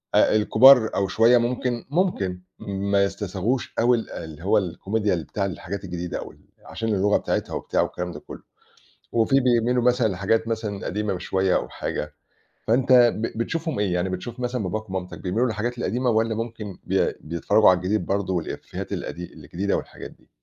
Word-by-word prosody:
آآ - - +5
الكبار 110 +2 +7
أو 100 - +1
شوية 115 +5 +5
ممكن 120 0 -1
ممكن 145 - 0 0.2
ما 100 -1 0
يستساغوش 100 +5 -2
أوي 120 +1 +4
ال 115 - -6
اللي 80 -1 -8
هو 105 +3 +3
الكوميديا 100 +2 -1
ل 85 - -4
بتاع 100 +4 -3
الحاجات 95 +1 -5
الجديدة، 90 0 -4
أو - - -8
ال - - -22 0.3
عشان 115 0 -4
اللغة 100 +2 +3
بتاعتها - - -2
وبتاع - - 0
والكلام 90 0 -3
ده 75 - -8
كلّه، - - -11 0.7
وفي 120 +4 +3
بيميلوا 125 -1 +2
مثلًا 125 -1 +3
لحاجات 105 +4 0
مثلًا 110 -3 -3
قديمة 105 +3 -1
م 90 - -4
شوية 95 +1 +1
أو - - -1
حاجة، 75 0 -4 0.6
فأنت 130 +3 +3
ب 120 -3 +4
بتشوفهم 160 +5 -2
إيه 100 -3 0
يعني 90 +1 0
بتشوف 95 +7 -6
مثلًا 125 -2 -2
باباك 105 +3 -4
ومامتك 95 -1 -5
بيميلوا 105 +7 0
للحاجات 120 +2 -3
القديمة 125 +1 0
والّا 110 0 +1
ممكن 110 -3 -6
بي - - +1
بيتفرّجوا 90 +7 +3
على 90 - +4
الجديد 90 +2 -1
برضه 95 -1 -1
والإفيهات 85 -2 -5
القديم 90 +1 -5
الجديدة 85 +7 -2
والحاجات - - -7
دي؟ - - -23
105 Hz, 175 wpm, -24 LUFS, 95-120 Hz, 0.7 s, الكبار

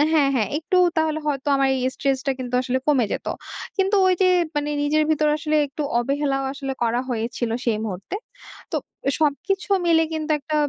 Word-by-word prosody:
হু - - +5
হ্যাঁ, 285 -3 +4
হ্যাঁ, 215 -5 +1
একটু 330 +3 -1 0.2
তাহলে 315 -1 +1
হয়তো 280 -1 -1
আমার 275 0 +3
এই 260 - -1
stress 275 -1 0
টা - - +3
কিন্তু 250 -1 -5
আসলে 260 0 0
কমে 270 -5 +4
যেত। - - -4 0.5
কিন্তু 390 +1 +2
ওইযে 370 0 +3 0.3
মানে 295 0 0
নিজের 305 +1 +2
ভিতরে 305 -1 +3
আসলে 310 0 0
একটু 280 +2 -5 0.2
অবহেলাও 275 +2 0
আসলে 275 -1 -4
করা 235 +1 +1
হয়েছিল 235 0 -2
সেই 225 -3 +1
মুহূর্তে। 195 - -5 0.6
তো - - +1 0.4
সবকিছু 345 +7 0 0.2
মিলে 325 -1 +5
কিন্তু 315 0 -3
একটা 305 +2 -5
285 Hz, 180 wpm, -23 LUFS, 255-310 Hz, 0.6 s, হু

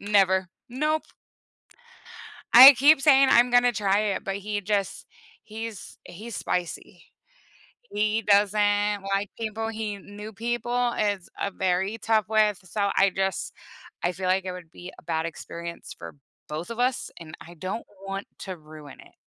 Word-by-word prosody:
Never. 190 -2 +2 0.2
Nope. 305 +5 -1 1.5
I 260 +4 +12
keep 280 +3 +5
saying 275 -2 +6
I'm 240 +1 +5
gonna 245 0 +5
try 205 -3 +1 0.2
it, - - -6
but 195 0 -3
he 205 +1 -4
just 200 0 -2 0.4
he's 225 -1 -8
he's 220 +6 -9
spicy. 175 -2 -4 0.9
He 215 +2 0
doesn't 205 0 +2
like 200 0 -2
people, 225 0 -3
he 215 -2 -4
new 205 +2 -10
people 240 +2 -1
is 205 -4 -2
a 200 - -1
very 190 +3 -1
tough 220 -2 +1
with, 215 -2 +2
so, 200 +2 -1
I 195 0 +4
just 195 0 -2 0.5
I 175 - 0
feel 185 +1 -5
like 185 +1 +1
it 185 - -4
would 180 -3 -11
be 180 +2 -11
a - - -14
bad 160 -1 -2
experience 170 +1 -8
for - - -9 0.3
both 155 +7 -6
of 230 - -6
us, 250 +1 0
and 160 -2 -11
I 170 - -12
don't 185 +7 -5 0.2
want 195 +1 -5
to 185 -2 -6
ruin 155 -2 -13
it. - - -19
205 Hz, 155 wpm, -25 LUFS, 185-225 Hz, 1.5 s, I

